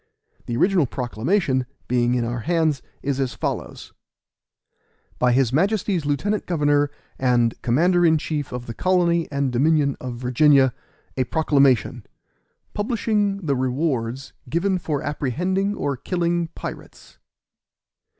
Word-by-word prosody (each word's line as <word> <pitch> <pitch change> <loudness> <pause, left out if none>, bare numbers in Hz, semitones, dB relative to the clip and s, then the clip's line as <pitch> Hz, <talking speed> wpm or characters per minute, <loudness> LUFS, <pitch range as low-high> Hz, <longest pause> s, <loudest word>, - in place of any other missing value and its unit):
The 120 - -2
original 180 -2 +3
proclamation, 130 - -1 0.2
being 120 0 +2
in 120 -1 0
our 120 +1 -3
hands, 160 -1 0 0.2
is 140 -1 -1
as 130 -3 -1
follows: - - -5 1.3
By 125 0 +3
his 130 -1 +2
Majesty's 190 -1 +1
Lieutenant 200 +9 -1
Governor 145 -3 +2 0.3
and 120 -3 +2
Commander 175 +9 +3
in 160 -2 +5
Chief 150 -2 -3
of 125 0 -5
the 115 - -6
Colony 170 +1 +1
and 140 -2 0
Dominion 140 +2 +2
of 125 -1 -5
Virginia. 130 +2 +4 0.4
A 130 - +1
PROCLAMATION, 140 -5 +2 0.7
Publishing 205 -3 -1
the 140 -3 +1
Rewards 130 -1 -2 0.2
given 185 +6 0
for 150 -4 -3
apprehending 180 - -1
or 145 -7 -2
killing 170 +3 -1
Pirates. - - -9
145 Hz, 120 wpm, -22 LUFS, 125-175 Hz, 1.3 s, in